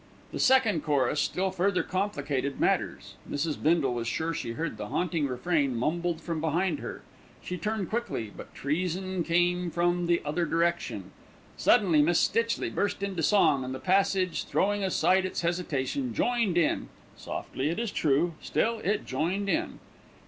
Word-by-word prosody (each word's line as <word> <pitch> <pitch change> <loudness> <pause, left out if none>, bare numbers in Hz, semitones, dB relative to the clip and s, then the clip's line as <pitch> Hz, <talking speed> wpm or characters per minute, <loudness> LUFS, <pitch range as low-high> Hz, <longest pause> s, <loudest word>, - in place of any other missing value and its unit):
The - - -5
second 230 - +4
chorus 145 0 +1
still 190 +1 0
further 190 +1 +1
complicated 145 -8 -2
matters. - - 0 0.2
Mrs. 150 +1 -2
Bindle 155 -5 +2
was 120 -1 -3
sure 160 +7 -1
she 115 -6 -4
heard 155 -3 -3
the 105 - -5
haunting 165 +1 0
refrain 140 +1 0
mumbled 170 +6 -1
from 165 -2 -3
behind 165 +1 0
her. - - -7 0.4
She 180 - -4
turned 210 0 -3
quickly; 215 - -2
but - - -11
treason 180 +4 -1
came 175 +1 +1
from 175 +1 +1
the 170 0 +3
other 165 +3 0
direction. 165 - -1 0.4
Suddenly 170 -7 +4
Miss 170 +3 +3
Stitchley 230 0 +1
burst 200 -1 -1
into 195 -4 -2
song, 155 -7 +4
and 130 +1 -4
the - - -6
passage, 190 -1 +1
throwing 205 +1 +1
aside 190 0 +3
its 185 - -3
hesitation, 175 - -1
joined 235 -7 +1
in, 170 - +1 0.3
softly 135 +3 -4
it 170 - -2
is 230 -3 -2
true, 155 +3 +1
still 230 0 0
it 210 +1 -1
joined 180 +9 -1
in. 330 +7 -1
175 Hz, 155 wpm, -28 LUFS, 150-190 Hz, 0.4 s, second